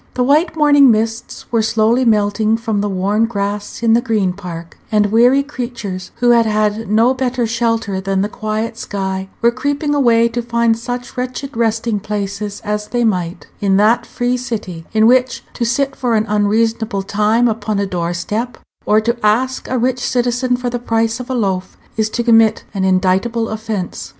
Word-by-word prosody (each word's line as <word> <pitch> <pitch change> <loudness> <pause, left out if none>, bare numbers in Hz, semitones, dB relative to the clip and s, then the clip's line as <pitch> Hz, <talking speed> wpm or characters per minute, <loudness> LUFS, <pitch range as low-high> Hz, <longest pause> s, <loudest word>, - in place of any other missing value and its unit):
The 250 - +1
white 305 +6 +2
morning 290 -3 +5
mists 225 +1 -1
were 230 -2 +2
slowly 225 +3 +2
melting 215 0 +2
from 225 -3 -2
the 205 - -1
worn 200 +4 +1
grass 205 0 -4
in 225 -1 +4
the 235 - +4
Green 215 -7 0
Park; 170 -3 -8 0.2
and 210 -1 +2
weary 245 +5 +4
creatures, 235 -9 -6
who 240 0 +3
had 230 -1 +4
had 215 0 0
no 225 +4 +4
better 255 -2 -1
shelter 230 -4 -1
than 195 0 0
the - - 0
quiet 215 +1 -4
sky, 190 -1 -4
were 235 - +5
creeping 285 +4 -1
away 235 -5 +4
to 240 +1 -3
find 235 -1 +1
such 245 +2 -6
wretched 255 +2 -5
resting 225 -1 0
places 205 0 -4
as 210 0 -2
they 240 -1 -1
might, 180 -6 -1
in 195 -1 +2
that 215 +4 +3
free 245 +1 -1
city, 210 -9 -5
in 220 0 +3
which 255 +1 +3
to 235 - -2
sit 270 +3 0
for 245 -3 0
an 215 0 +1
unreasonable 215 0 0
time 215 +4 +2
upon 215 -2 -2
a 200 - 0
door 175 -2 -3
step, 220 +7 -3 0.3
or 215 - +4
to 235 +2 0
ask 250 +5 +1
a 255 - -1
rich 250 +1 0
citizen 245 0 0
for 245 -1 -3
the 245 - -2
price 230 0 0
of 250 - -7
a 260 - -1
loaf, 190 -5 -2 0.2
is 220 -1 0
to 235 - -2
commit 225 -2 +4
an 195 -2 -2
indictable 190 +5 +1
offence. 215 -4 -4
225 Hz, 185 wpm, -17 LUFS, 205-245 Hz, 0.3 s, morning